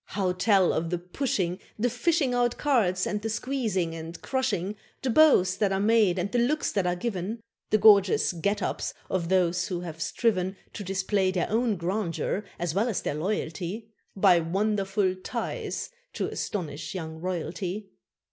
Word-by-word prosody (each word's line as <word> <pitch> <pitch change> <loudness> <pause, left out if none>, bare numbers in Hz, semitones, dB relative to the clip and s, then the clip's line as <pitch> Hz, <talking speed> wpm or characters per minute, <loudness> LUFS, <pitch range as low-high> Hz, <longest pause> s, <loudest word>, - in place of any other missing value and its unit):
How 190 -2 +2
tell 190 0 +3
of 165 +1 -1
the 175 - 0
pushing, 180 -1 -2 0.2
The 225 +3 +1
fishing 260 +3 +1
out 245 -1 +1
cards, 205 -11 +2
and 210 - -2
the 225 - -3
squeezing 215 -8 -1
and 165 +1 -7
crushing, 210 -7 -1 0.3
The 260 - +1
bows 225 -11 +5
that 205 -2 +1
are 195 - +1
made 210 -3 +4
and 185 +2 -1
the 245 - +2
looks 285 +6 +1
that 195 -3 0
are 175 - +1
given, 200 +2 -3 0.3
The 215 - +4
gorgeous 200 -3 +5
"get 200 +4 -1
ups" - - -2 0.2
of 170 -3 -1
those 180 -1 +2
who 180 -3 -3
have 165 -2 -7
striven 190 0 0 0.2
To 205 - -6
display 190 0 0
their 185 0 -1
own 225 -1 +2
grandeur 185 +2 -2
as 175 -2 -2
well 210 +6 +1
as 215 - -2
their - - -1
loyalty, 190 +5 -3 0.2
By 190 -3 +5
wonderful 195 +2 0
ties 185 - -4 0.2
to - - -2
astonish 165 -2 -4
young 160 -3 -5
royalty! 185 +3 -4
195 Hz, 165 wpm, -27 LUFS, 180-220 Hz, 0.3 s, bows